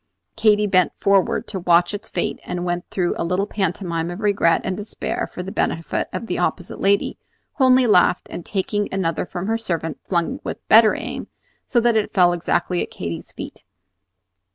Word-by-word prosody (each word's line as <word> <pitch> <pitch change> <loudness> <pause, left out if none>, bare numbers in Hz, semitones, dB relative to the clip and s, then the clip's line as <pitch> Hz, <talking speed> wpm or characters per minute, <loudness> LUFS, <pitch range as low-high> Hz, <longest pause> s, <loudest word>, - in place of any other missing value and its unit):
Katy 210 -1 +3
bent 185 -3 +3
forward 195 -2 +2
to 195 - -4
watch 175 +1 +3
its 210 +2 -6
fate, - - -2
and 175 0 -4
went 175 0 -3
through 180 -2 0
a - - 0
little 180 +4 0
pantomime 175 -4 -2
of 175 +2 -6
regret 200 -5 +3
and 185 - -2
despair 210 +2 -4
for 180 - -6
the 190 - -6
benefit 165 -3 -1
of - - -4
the - - -3
opposite 180 -1 -2
lady, 200 +1 +1 0.4
who 265 - +5
only 255 0 +5
laughed, 180 -4 +4
and 175 - -6
taking 205 +2 -2
another 180 -2 -1
from 180 0 -5
her 225 +2 0
servant 165 -7 -2
flung 170 -3 0
with - - -6
better 220 0 +7
aim, - - -5 0.4
so 240 - +3
that 235 -1 +2
it 215 -1 0
fell 175 -2 +5
exactly 175 +1 0
at - - -4
Katy's 85 -2 -6
feet. - - -9
190 Hz, 185 wpm, -21 LUFS, 175-210 Hz, 0.4 s, better